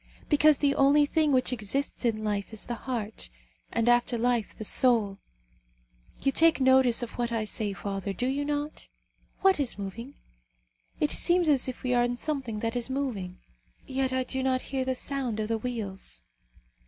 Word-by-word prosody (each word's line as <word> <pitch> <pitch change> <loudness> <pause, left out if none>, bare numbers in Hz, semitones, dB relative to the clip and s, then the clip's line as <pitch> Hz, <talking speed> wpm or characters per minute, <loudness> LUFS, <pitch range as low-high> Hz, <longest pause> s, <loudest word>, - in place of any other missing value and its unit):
Because 300 -1 +5
the 285 -1 +2
only 280 +2 +4
thing 310 0 +1
which 255 -1 +2
exists 250 +4 -2
in 215 -2 0
life 205 -1 -2
is 220 - -4
the 240 - -4
heart; 225 - -5 0.4
and 230 0 0
after 240 0 +3
life, 235 -2 0
the - - -7
soul. 215 -4 +3 1.0
You 275 - +3
take 325 +2 +4
notice 260 -2 +4
of 235 - -5
what 240 -1 -1
I 225 -2 -1
say, 215 -1 -2
father, 195 0 -4
do 195 +6 -3
you 275 +3 -1
not? 295 +1 -4 0.5
What 385 -4 +4
is 265 -6 0
moving? 225 +7 -7 0.8
It 300 - +1
seems 350 -1 +2
as 275 -4 +4
if 255 - -6
we 250 -1 0
are 240 0 +3
in 245 0 -1
something 260 -7 -3
that 230 +1 -2
is 245 +1 -1
moving, 230 -10 -4 0.4
yet 265 0 -1
I 260 0 0
do 265 +1 -3
not 260 -1 0
hear 265 -1 +1
the 260 0 -1
sound 255 -5 -2
of 215 0 -2
the 225 -1 0
wheels." 200 - -5
245 Hz, 180 wpm, -28 LUFS, 220-275 Hz, 1.0 s, Because